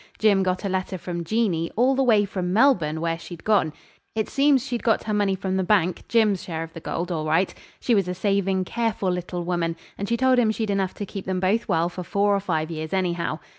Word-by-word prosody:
Jim 205 Hz, -3 st, +4 dB
got 185 Hz, +1 st, -1 dB
a -, -, +1 dB
letter 185 Hz, 0 st, -2 dB
from 175 Hz, 0 st, -5 dB
Jeanie, 175 Hz, -4 st, 0 dB
all 250 Hz, +4 st, +3 dB
the 270 Hz, -, +1 dB
way 220 Hz, -5 st, +4 dB
from 185 Hz, -2 st, -3 dB
Melbourne, 180 Hz, -, +3 dB
where 165 Hz, 0 st, -1 dB
she'd 170 Hz, -1 st, -10 dB
gone. 200 Hz, -7 st, +2 dB, 0.4 s
It 220 Hz, -1 st, 0 dB
seems 275 Hz, -2 st, +3 dB
she'd 245 Hz, -4 st, -3 dB
got 225 Hz, -2 st, +2 dB
her 215 Hz, -, -2 dB
money 205 Hz, -2 st, +2 dB
from 190 Hz, 0 st, -2 dB
the 190 Hz, -, +1 dB
bank 185 Hz, -2 st, +1 dB
Jim's 215 Hz, -5 st, +2 dB
share 165 Hz, -2 st, -4 dB
of 165 Hz, 0 st, -10 dB
the -, -, -7 dB
gold 170 Hz, +2 st, -3 dB
all 155 Hz, -2 st, -2 dB
right. 165 Hz, +5 st, +2 dB, 0.3 s
She 245 Hz, -, +1 dB
was 195 Hz, -4 st, +2 dB
a 180 Hz, -, -3 dB
saving, 195 Hz, -1 st, 0 dB
careful 225 Hz, -3 st, -1 dB
little 180 Hz, 0 st, -3 dB
woman, 170 Hz, -1 st, -1 dB, 0.2 s
and 200 Hz, -, -3 dB
she 235 Hz, -, +1 dB
told 260 Hz, 0 st, +4 dB
him 230 Hz, -3 st, +3 dB
she'd 220 Hz, -1 st, -1 dB
enough 195 Hz, -2 st, -1 dB
to 205 Hz, -, -4 dB
keep 195 Hz, 0 st, -7 dB
them 185 Hz, -1 st, -1 dB
both 195 Hz, +5 st, +1 dB
well 165 Hz, +1 st, +2 dB
for 175 Hz, +1 st, -6 dB
four 200 Hz, +3 st, +1 dB
or -, -, +1 dB
five 165 Hz, -4 st, -2 dB
years, 155 Hz, +1 st, -5 dB
anyhow. 175 Hz, -4 st, -1 dB
190 Hz, 240 wpm, -24 LUFS, 175-215 Hz, 0.4 s, Jim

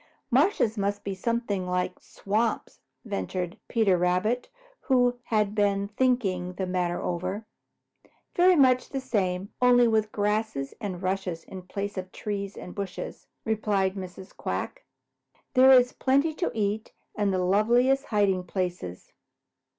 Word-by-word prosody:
"Marshes 245 Hz, -, +3 dB
must 200 Hz, +1 st, -1 dB
be 200 Hz, -, -3 dB
something 205 Hz, -2 st, -2 dB
like 180 Hz, 0 st, -1 dB
swamps," 215 Hz, +3 st, -2 dB, 0.3 s
ventured 180 Hz, -, -3 dB
Peter 205 Hz, -6 st, +2 dB
Rabbit, 185 Hz, +8 st, +1 dB, 0.4 s
who 245 Hz, -2 st, +3 dB
had 210 Hz, -2 st, +1 dB
been 200 Hz, -1 st, +1 dB
thinking 205 Hz, -7 st, 0 dB
the 190 Hz, +1 st, -3 dB
matter 180 Hz, -1 st, -1 dB
over. 185 Hz, +5 st, -3 dB, 0.9 s
"Very 360 Hz, +1 st, +5 dB
much 255 Hz, -4 st, +4 dB
the 270 Hz, -, -3 dB
same, 195 Hz, -7 st, -1 dB
only 245 Hz, -1 st, +6 dB
with 220 Hz, -1 st, +1 dB
grass 210 Hz, -3 st, 0 dB, 0.2 s
and 190 Hz, -4 st, -4 dB
rushes 185 Hz, -3 st, -2 dB
in 190 Hz, -, -9 dB
place 200 Hz, +2 st, -4 dB
of 185 Hz, 0 st, -8 dB
trees 200 Hz, -1 st, -4 dB
and 180 Hz, -, -8 dB
bushes," 200 Hz, -2 st, -6 dB, 0.2 s
replied 205 Hz, -3 st, +1 dB
Mrs. 185 Hz, 0 st, -9 dB
Quack. -, -, -4 dB, 0.7 s
"There 260 Hz, 0 st, +7 dB
is 250 Hz, -1 st, +6 dB
plenty 280 Hz, +4 st, +2 dB
to 350 Hz, +3 st, -1 dB
eat 215 Hz, 0 st, -2 dB, 0.2 s
and 205 Hz, -2 st, +1 dB
the 190 Hz, -, 0 dB
loveliest 240 Hz, +8 st, +3 dB
hiding 195 Hz, -4 st, +1 dB
places. 175 Hz, -, -4 dB
205 Hz, 135 wpm, -27 LUFS, 185-235 Hz, 0.9 s, There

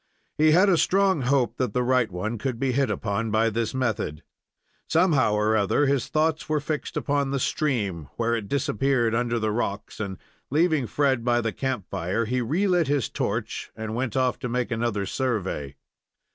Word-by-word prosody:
He 155 Hz, +1 st, +4 dB
had 180 Hz, +6 st, +5 dB
a 180 Hz, -4 st, +4 dB
strong 195 Hz, -4 st, +3 dB
hope 130 Hz, 0 st, +1 dB
that 125 Hz, -5 st, -1 dB
the 125 Hz, -, +2 dB
right 125 Hz, -2 st, +2 dB
one 105 Hz, +6 st, -3 dB
could 130 Hz, 0 st, -2 dB
be 130 Hz, +2 st, 0 dB
hit 135 Hz, 0 st, +1 dB
upon 105 Hz, +2 st, -2 dB
by 110 Hz, +1 st, +2 dB
this 115 Hz, +2 st, -2 dB
method. 110 Hz, -12 st, -2 dB, 0.6 s
Somehow 140 Hz, -, +3 dB
or 105 Hz, +1 st, +2 dB
other, 110 Hz, +7 st, +2 dB
his 140 Hz, -2 st, +1 dB
thoughts 155 Hz, 0 st, 0 dB
were 155 Hz, -1 st, +2 dB
fixed 150 Hz, +1 st, -4 dB
upon 140 Hz, -1 st, 0 dB
the 140 Hz, -, 0 dB
stream, 105 Hz, -, -1 dB
where 115 Hz, 0 st, 0 dB
it 110 Hz, -3 st, -4 dB
disappeared 130 Hz, -1 st, +1 dB
under 120 Hz, 0 st, 0 dB
the 110 Hz, -1 st, 0 dB
rocks, 105 Hz, -2 st, -3 dB
and, 100 Hz, -3 st, -4 dB, 0.3 s
leaving 155 Hz, -3 st, +2 dB
Fred 135 Hz, 0 st, +1 dB
by 120 Hz, 0 st, +2 dB
the 115 Hz, -2 st, -2 dB
camp 130 Hz, -8 st, -2 dB
fire, 95 Hz, +8 st, -1 dB
he 125 Hz, +3 st, -1 dB
relit 175 Hz, -, +1 dB
his 140 Hz, -3 st, 0 dB
torch -, -, -3 dB
and 110 Hz, 0 st, -5 dB
went 120 Hz, +1 st, -2 dB
off 130 Hz, -1 st, +1 dB
to 125 Hz, -, -4 dB
make 125 Hz, +1 st, -1 dB
another 115 Hz, -3 st, -1 dB
survey. 95 Hz, -, -2 dB
120 Hz, 185 wpm, -25 LUFS, 110-140 Hz, 0.6 s, had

